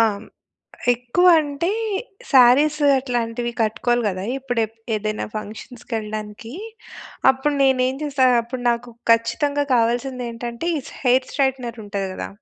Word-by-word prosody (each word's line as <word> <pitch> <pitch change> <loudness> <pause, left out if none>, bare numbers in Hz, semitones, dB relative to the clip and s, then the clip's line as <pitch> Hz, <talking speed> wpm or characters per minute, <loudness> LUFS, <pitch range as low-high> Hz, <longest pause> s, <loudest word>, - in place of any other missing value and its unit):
ఆ! - - +7 0.9
ఎక్కువ 245 +9 +1
అంటే 290 +4 -2 0.6
శారీస్ 275 +4 +6 0.2
అట్లాంటివి 240 -2 -2
కట్టుకోవాలి 230 +2 +1
గదా! 185 0 -4
ఇప్పుడు 250 -3 -2
ఎప్ 225 +1 -25 0.2
ఏదైనా 215 0 -3
ఫంక్షన్స్‌కి 220 +3 -8
ఎళ్ళడానికీ. 215 +2 -7 0.8
అప్పుడు 265 +3 -1
నేనేం 260 -1 +2
చేస్తా, 270 -3 +2 0.2
అప్పుడు 245 +2 -6
నాకు 235 +1 -3 0.2
ఖచ్చితంగా 285 +5 +1
కావాల్సింది 245 +2 0
ఏంటంటే 235 +6 -5
ఈ - - -4 0.2
హెయిర్ 255 +1 +3
స్ట్రెయిట్‌నర్ 255 -4 -1
ఉంటది 200 -1 -3
గదా! - - -5
245 Hz, 120 wpm, -21 LUFS, 230-265 Hz, 0.9 s, ఆ